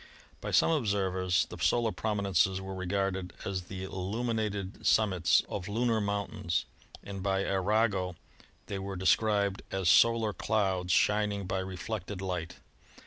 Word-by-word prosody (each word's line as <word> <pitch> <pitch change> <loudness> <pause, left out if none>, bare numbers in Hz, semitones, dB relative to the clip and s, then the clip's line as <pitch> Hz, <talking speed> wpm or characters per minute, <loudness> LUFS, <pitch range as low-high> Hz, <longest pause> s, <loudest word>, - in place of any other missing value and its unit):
By - - -4
some - - +4
observers 95 - +1
the - - -10
solar 120 -2 +2
prominences 100 -3 +1
were 95 0 -6
regarded 95 -1 -2
as 95 -2 -3
the 95 0 -6
illuminated 100 +1 -3
sum 110 -2 +4
mits 90 -2 +3
of 95 -1 -5
lunar 115 +1 +1
mountains, 100 -4 -1 0.4
and 100 -1 -6
by 95 0 0
Arago 100 -1 +1 0.5
they 100 - -4
were 95 0 -5
de 95 +1 -5
scribed 100 -1 +2
as 95 -3 0
solar 115 -2 +4
clouds 95 -5 0
shining 105 -1 +2
by 95 +1 -1
reflected 95 +1 -5
light. 90 -3 -4
100 Hz, 140 wpm, -30 LUFS, 95-105 Hz, 0.5 s, some